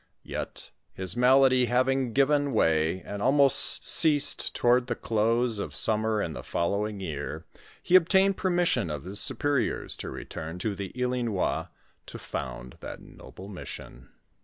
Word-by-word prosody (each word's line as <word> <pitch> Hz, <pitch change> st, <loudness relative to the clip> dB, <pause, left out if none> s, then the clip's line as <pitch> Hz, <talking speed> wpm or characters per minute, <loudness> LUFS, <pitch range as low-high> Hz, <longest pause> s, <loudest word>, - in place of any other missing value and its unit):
Yet, -, -, -6 dB, 0.2 s
his 95 Hz, +2 st, -3 dB
malady 130 Hz, +1 st, +4 dB
having 130 Hz, +1 st, +1 dB
given 140 Hz, +2 st, +1 dB
way 80 Hz, -2 st, +1 dB
and 100 Hz, 0 st, -7 dB
almost 135 Hz, +2 st, +4 dB
ceased 145 Hz, -3 st, +3 dB
toward 125 Hz, +1 st, +2 dB
the 120 Hz, -, -2 dB
close 115 Hz, +1 st, 0 dB
of -, -, -6 dB
summer 110 Hz, -1 st, 0 dB
in 80 Hz, -, -5 dB
the -, -, -7 dB
fol 85 Hz, -, -2 dB
lowing 105 Hz, 0 st, -3 dB
year, 80 Hz, -2 st, -6 dB, 0.4 s
he 180 Hz, -, +2 dB
obtained 190 Hz, +2 st, +4 dB
permission 175 Hz, -, 0 dB
of 75 Hz, -2 st, -5 dB
his 95 Hz, +3 st, -2 dB
superiors 145 Hz, -3 st, 0 dB
to -, -, -6 dB
return 80 Hz, +2 st, -7 dB
to 100 Hz, +4 st, -3 dB
the 100 Hz, -1 st, -7 dB
Ilinois 125 Hz, -5 st, -2 dB, 0.4 s
to -, -, -9 dB
found 60 Hz, 0 st, -7 dB
that -, -, -8 dB
noble 95 Hz, -, -13 dB
mission. 75 Hz, -9 st, -10 dB
115 Hz, 145 wpm, -27 LUFS, 95-135 Hz, 0.4 s, malady